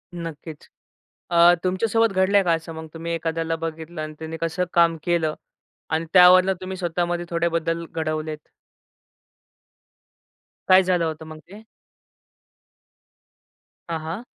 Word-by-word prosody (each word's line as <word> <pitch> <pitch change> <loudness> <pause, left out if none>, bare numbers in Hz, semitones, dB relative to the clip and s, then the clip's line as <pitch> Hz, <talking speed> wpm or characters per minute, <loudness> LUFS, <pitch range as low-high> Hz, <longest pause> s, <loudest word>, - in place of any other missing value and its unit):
नक्कीच 165 -2 -8 0.6
अ, 170 +1 +6
तुमच्या 185 +5 0
सोबत 225 -1 +2
घडलंय 195 +1 +3
का? 170 - +2
असं 165 0 -3
मग 160 0 -8
तुम्ही 165 +1 -5
एखाद्याला 165 0 -2
बघितलं 165 0 -6
आणि 155 0 -7
त्यांनी 160 0 -6
कसं 165 +2 -1
काम 170 -1 +4
केलं? 165 -3 0 0.6
आणि 160 +1 -1
त्यावरनं 185 +1 +7
तुम्ही 185 0 -6
स्वतःमध्ये 175 0 -2
थोडे 170 0 0
बदल 165 0 -3
घडवलेत. 155 -1 -3 2.3
काय 185 0 +7
झालं 180 -2 +1
होतं 160 0 -5
मग 155 0 -10
ते? 205 +3 -12 2.3
हां, 165 -1 -2
हां. 165 +9 -6
170 Hz, 125 wpm, -23 LUFS, 160-180 Hz, 2.3 s, त्यावरनं